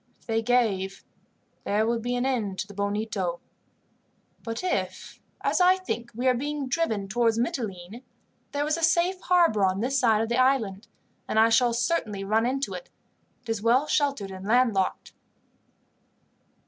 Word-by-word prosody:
If - - -29
they 225 -2 0
gave, 210 -6 0 0.6
there 210 +2 +1
would 230 0 0
be 245 +2 -2
an 245 +1 -1
end 220 -8 -1
to 205 - -3
the 205 - -11
Bonito. 200 -3 -2 1.0
But 230 +7 -5
if, 365 - -3 0.2
as - - +1
I 365 +1 +6
think, 240 -11 -4
we 250 +3 -1
are 255 - +5
driving 275 -4 -2
towards 230 +2 +1
Mitylene, 220 -3 -3 0.5
there 290 0 -1
is 305 +2 0
a - - -5
safe 345 +3 +2
harbour 340 - +3
on 190 0 +2
this 265 +5 0
side 225 -4 +3
of 225 - -4
the 235 +1 +1
island, 230 -6 +1 0.4
and - - -2
I 225 +1 +6
shall 235 +1 +4
certainly 235 -5 -1
run 220 +4 +1
into 275 +2 -2
it. - - -8 0.5
It 240 - -13
is 225 -2 -1
well 240 +6 +3
sheltered 280 -10 0
and 190 0 -8
landlocked." 225 -5 +1
235 Hz, 160 wpm, -26 LUFS, 205-270 Hz, 1.0 s, I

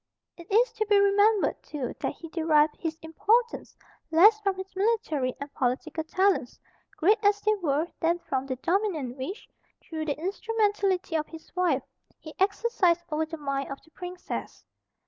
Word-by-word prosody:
It 340 +2 -13
is 470 +5 +4
to 435 - -2
be 415 -1 +5
remembered 405 +1 +3
too 280 -5 -5
that - - -2
he 330 - -10
derived 315 -2 +3
his 320 -2 -4
importance 450 +9 0 0.3
less 415 +7 +6
from 395 -2 0
his 380 0 -8
military 375 - 0
and 280 0 -7
political 275 +6 -1
talents, 370 -5 +1 0.4
great 415 +6 +3
as 410 0 +4
they 430 - +3
were, 300 -1 +1
than 335 +1 +2
from 270 -5 -3
the 260 - -2
dominion 335 - -1
which, 285 +10 -6 0.3
through 315 -1 -5
the 290 -2 -2
instrumentality 400 -1 0
of 305 -1 0
his 325 +1 -13
wife, 345 -7 +1 0.3
he 310 - -11
exercised 385 -3 +2
over 310 +1 0
the 325 +1 -6
mind 275 -2 -3
of 275 - -4
the 320 - -24
Princess. 360 +1 -7
345 Hz, 165 wpm, -27 LUFS, 305-405 Hz, 0.4 s, less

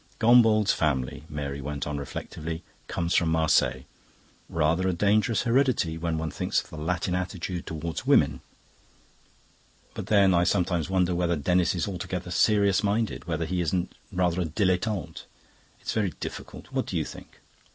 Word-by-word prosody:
"Gombauld's 110 -3 +5
family," 70 -2 -1
Mary 70 -2 -4
went 70 +1 -4
on 75 -1 -3
reflectively, 80 +4 -6 0.2
"comes 85 +1 -1
from 85 - +3
Marseilles. 75 -5 +2 0.7
Rather 85 +3 +1
a 95 - +1
dangerous 105 +5 +2
heredity, 120 -9 +2
when 80 0 -2
one 80 -1 -3
thinks - - 0
of - - -9
the 80 - -8
Latin 90 +3 -1
attitude 90 -1 -3
towards 80 +1 -4
women. - - +3 1.5
But - - -6
then, 100 -3 +5
I 85 0 +4
sometimes 90 -2 +1
wonder 90 -1 +2
whether 85 0 +1
Denis 90 +4 +1
is 85 - -1
altogether 90 -1 -4
serious 100 0 +3
minded, 105 +2 -1
whether 80 -1 -1
he 90 +2 -1
isn't 85 +2 -1 0.2
rather 90 0 +1
a - - 0
dilettante. 90 0 -1 0.6
It's - - -3
very 100 -6 0
difficult. - - -8
What - - -1
do - - -2
you - - 0
think?" - - -11
90 Hz, 155 wpm, -27 LUFS, 80-95 Hz, 1.5 s, Gombauld's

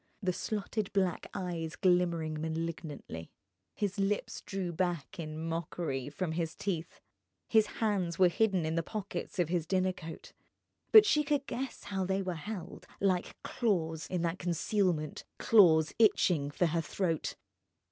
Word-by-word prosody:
The 185 -1 +1
slotted 210 +1 -3
black 190 -3 0
eyes 170 -4 -4
glimmered 170 -4 +2
malignantly. 160 - -4 0.5
His 205 -1 -2
lips 200 +1 -1
drew 190 -3 -3
back 175 -2 -2
in 155 -1 -5
mockery 160 -4 -3
from 165 +3 -3
his 165 0 -2
teeth. 175 -4 -3 0.5
His 220 -2 +4
hands 195 -7 -1
were 185 - +7
hidden 190 -2 +2
in 160 - -1
the 165 - +1
pockets 205 +3 -5
of 175 -3 +1
his 170 -2 0
dinner 185 0 +2
coat; 165 -3 -9 0.6
but 435 -1 +10
she 300 -7 +4
could 290 -1 0
guess 265 -1 -5
how 195 -1 -2
they 190 +1 0
were 185 -1 -2
held, 180 +2 -7
like 185 -3 0
claws, 165 -9 -1
in 180 -2 -2
that 170 +2 -1
concealment, 175 -2 0
claws 160 -8 +5
itching 175 -9 +4
for 160 +4 +1
her 165 0 +1
throat. 165 0 -2
180 Hz, 145 wpm, -32 LUFS, 160-195 Hz, 0.6 s, but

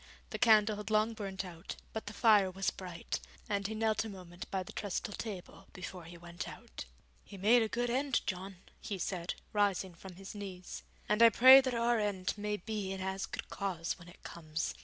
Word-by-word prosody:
The - - -4
candle 215 -3 +5
had 210 +1 -6
long 215 +1 +3
burnt 195 -3 -4
out, 170 -2 -8 0.2
but 220 - -5
the 210 - -5
fire 210 -3 +5
was 190 +1 -1
bright, 180 -3 -5 0.3
and 200 -1 0
he 220 - -4
knelt 220 0 +1
a 225 - -6
moment 180 -3 -9
by 190 -1 -1
the - - -10
trestle 205 0 -3
table 200 -5 -7
before 180 -1 -7
he 170 +1 -10
went 170 0 -7
out. - - -9 0.4
'He 200 - -11
made 225 +6 +5
a 220 - +2
good 240 +1 -1
end, 265 0 +1
John,' 190 0 -4 0.2
he 200 - -4
said, 180 -1 -3 0.2
rising 200 -3 +1
from 180 +2 -11
his 195 +1 -9
knees, 190 -3 -7 0.3
'and 210 +2 +2
I 230 - +10
pray 260 +4 +10
that 255 -2 -1
our 235 0 +2
end 200 -3 -1
may 210 0 -2
be 205 0 -4
in 195 - -4
as 190 +1 -2
good - - -6
cause 185 -4 -2
when 170 - -13
it 175 - -16
comes. 160 -1 -4
200 Hz, 205 wpm, -33 LUFS, 185-215 Hz, 0.4 s, I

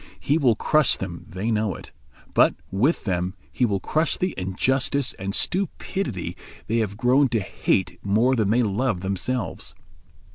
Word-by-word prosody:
He 150 +3 +1
will 125 -7 +4
crush 150 +5 +3
them, 90 -3 -6
they 100 +5 -2
know 105 -4 0
it; - - -11 0.4
but - - +5 0.2
with 125 - +1
them 90 -1 -1 0.2
he 125 - +1
will 100 -2 0
crush 155 +9 0
the 185 0 -1
injustice 125 +8 0
and 95 +1 -2
stupidity 180 - -1 0.3
they 115 - 0
have 100 -2 -2
grown 130 +4 +4
to 120 -3 0
hate 95 -1 -1
more 110 +6 +3
than 110 -5 +1
they 120 +3 +3
love 105 -2 0
themselves. 100 +5 -3
115 Hz, 155 wpm, -24 LUFS, 95-130 Hz, 0.4 s, but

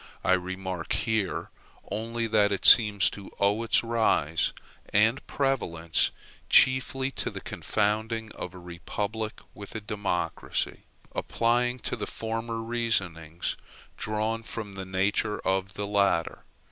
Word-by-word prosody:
I 95 - +4
remark 95 -1 -2
here 110 -4 -1 0.4
only 115 +2 -2
that 105 -2 +3
it 100 -2 -1
seems 105 -4 +7
to 100 -1 -9
owe 100 +3 +3
its 115 - +3
rise 110 -9 +2 0.4
and 110 +6 +3
prevalence 85 - 0 0.4
chiefly 130 +1 +4
to - - -2
the - - -7
confounding 110 +1 -1
of 90 - -7
a - - -8
republic 100 +5 -4
with 100 +1 -10
a - - -1
democracy, 100 -6 -2 0.3
applying 120 +2 +1
to - - -2
the 105 - -4
former 115 0 -3
reasonings 95 -9 -1 0.4
drawn 110 +1 -1
from 110 -2 -6
the 95 -1 -6
nature 100 +3 0
of 95 +1 -1
the 100 - -3
latter. 100 -5 +1
105 Hz, 125 wpm, -28 LUFS, 95-115 Hz, 0.4 s, seems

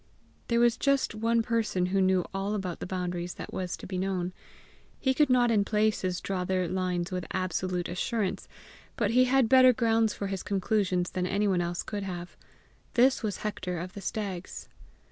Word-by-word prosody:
There 235 0 +2
was 240 -1 +4
just 275 -3 +1
one 230 +1 +1
person 225 -6 0
who 190 +2 +1
knew 185 -1 +3
all 195 +2 -1
about 185 -4 -4
the - - -5
boundaries 180 -1 -3
that - - -8
was 180 -1 -3
to - - -10
be 185 -1 -3
known; 185 -1 -2 0.7
he 265 -2 +2
could 295 +2 +3
not 245 -2 +4
in 210 -3 +3
places 210 -4 0
draw 190 -2 -2
their 185 -1 0
lines 180 0 -1
with 180 -1 -3
absolute 185 -1 -2
assurance, 200 +2 -2 0.5
but 210 -2 0
he 255 +2 +5
had 260 -1 +3
better 255 +1 +7
grounds 225 -2 +2
for 200 - -4
his 195 -1 -3
conclusions 190 -2 0
than 180 0 -1
anyone 195 -2 +1
else 175 0 -2
could 205 -1 -4
have; 175 -2 -6 0.6
this 255 +2 +4
was 215 -4 -2
Hector 200 -4 -3
of 180 +3 -6
the 200 - -8
Stags. 195 -4 -5
195 Hz, 185 wpm, -28 LUFS, 180-225 Hz, 0.7 s, better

